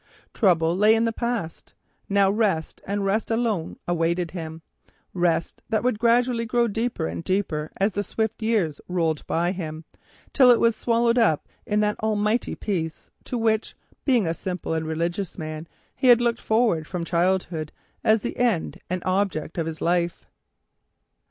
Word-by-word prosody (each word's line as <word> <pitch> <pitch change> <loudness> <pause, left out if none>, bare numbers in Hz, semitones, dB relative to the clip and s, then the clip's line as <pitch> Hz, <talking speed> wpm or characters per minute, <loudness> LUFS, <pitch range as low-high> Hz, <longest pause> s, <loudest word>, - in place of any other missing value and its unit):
Trouble 170 -5 +3
lay 210 +3 +5
in 225 +1 +2
the 230 - 0
past, 235 -9 -4 0.3
now 200 -1 +4
rest 200 -7 0
and 200 0 -1
rest 205 +3 0
alone 225 -7 -1
awaited 170 0 0
him, 160 -2 -7 0.5
rest 170 -2 0
that 220 0 +1
would 245 -4 +1
gradually 235 0 +3
grow 235 +1 +1
deeper 225 - -2
and 85 +1 -4
deeper 160 -6 -1
as 200 +3 +2
the 205 - -1
swift 220 +2 -2
years 210 -10 0
rolled 165 -4 0
by, 175 +2 +1 0.8
till 260 -3 +6
it 240 - +6
was 230 -1 +3
swallowed 235 +1 +2
up 160 -10 +2 0.2
in 210 0 +2
that 210 0 0
almighty 215 +1 0
Peace 165 -6 -4
to 250 - -3
which, 220 -1 0 0.3
being 245 -7 +3
a 165 - 0
simple 180 -1 -4
and 160 -1 -2
religious 170 +4 -2
man, 155 0 -6 0.3
he 260 - 0
had 240 -1 +8
looked 235 -1 0
forward 220 -9 +1
from 175 -3 -4
childhood 170 -3 0 0.3
as 220 0 +4
the - - -4
end 230 -10 0
and 180 0 -2
object 185 -4 -1
of 165 - -1
his 160 -1 -6
life. 170 0 0
195 Hz, 160 wpm, -24 LUFS, 165-225 Hz, 0.8 s, had